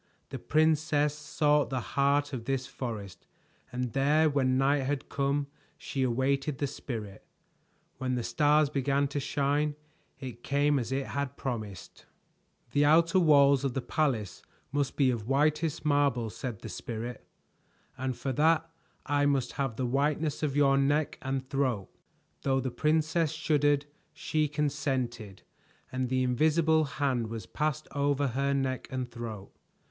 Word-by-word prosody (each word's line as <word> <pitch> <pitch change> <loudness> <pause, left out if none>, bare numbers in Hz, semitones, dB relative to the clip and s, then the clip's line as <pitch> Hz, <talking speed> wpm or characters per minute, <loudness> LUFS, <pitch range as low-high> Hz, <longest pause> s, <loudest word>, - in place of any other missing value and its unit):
The - - -6
princess 155 -1 +2
sought 150 0 +1
the 130 - -1
heart 140 +1 +2
of 120 -3 -4
this 135 -1 -1
forest, 110 -9 -7 0.4
and 125 -2 -3
there 150 +3 +3
when 130 -2 +2
night 140 +1 +3
had 135 +1 -3
come 140 +1 0 0.3
she 135 - -4
awaited 135 +3 0
the 145 - 0
Spirit. 115 -7 -6 0.8
When 130 -1 -1
the 120 - -2
stars 150 +2 +3
began 140 0 +1
to 145 - -2
shine, 145 +2 0 0.4
it 125 -3 -8
came 145 0 +2
as 120 0 -4
it 135 0 -1
had 140 -1 -4
promised. 110 -8 -6 0.6
"The 145 +4 +3
outer 165 +4 +5
walls 140 -4 +5
of 135 -3 -1
the 135 - 0
palace 130 - -1 0.3
must 140 -3 -1
be 135 -3 +3
of 115 -3 -4
whitest 150 +4 +1
marble," 140 -6 +2
said 120 -4 -6
the 110 - -7
Spirit, 115 +5 -6 0.7
"and 130 -1 -3
for 135 - -2
that 160 +4 +3 0.4
I 145 0 +2
must 135 -3 +1
have 135 -5 -2
the 130 - -2
whiteness 145 +4 0
of 145 -3 -1
your 140 -1 +4
neck 145 +2 +1
and 135 -1 -3
throat." 130 -8 -1 0.5
Though 135 -1 +1
the 130 -1 -2
princess 155 +4 +1
shuddered, 145 -2 +2 0.3
she 155 -1 0
consented, 135 -8 -2 0.5
and 130 -1 -2
the 130 0 +1
invisible 155 +5 +3
hand 135 -5 -1
was 115 0 -6
passed 155 0 -2
over 140 -1 +1
her 140 +3 0
neck 130 -2 -1
and 130 -2 -3
throat. 115 -4 -7
140 Hz, 150 wpm, -29 LUFS, 130-145 Hz, 0.8 s, outer